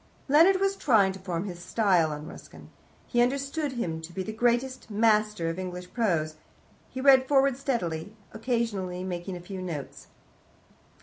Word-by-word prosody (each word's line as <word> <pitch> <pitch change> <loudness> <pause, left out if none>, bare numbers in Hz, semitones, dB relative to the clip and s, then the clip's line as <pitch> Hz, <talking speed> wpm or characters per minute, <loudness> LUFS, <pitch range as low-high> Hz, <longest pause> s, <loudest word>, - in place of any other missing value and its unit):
Leonard 335 +7 +5
was 390 0 +1
trying 220 - +3
to 190 - -10
form 180 -2 -3
his 175 -3 -7
style 180 -5 +2
on 150 0 -6
Ruskin: - - -12 0.3
he 240 - +1
understood 275 +3 -1
him 165 -10 -3
to 160 +1 -9
be 190 +2 -4
the 215 - -5
greatest 240 +3 0
master 210 -4 +2
of 165 +2 -3
English 180 -1 -6
Prose. 165 -9 0 0.5
He 260 - -7
read 260 -1 +6
forward 275 -2 +3
steadily, 215 - -3 0.2
occasionally 220 -6 -2
making 180 0 -5
a - - -9
few 185 +2 -7
notes. 165 -6 -6
210 Hz, 160 wpm, -27 LUFS, 180-255 Hz, 0.5 s, read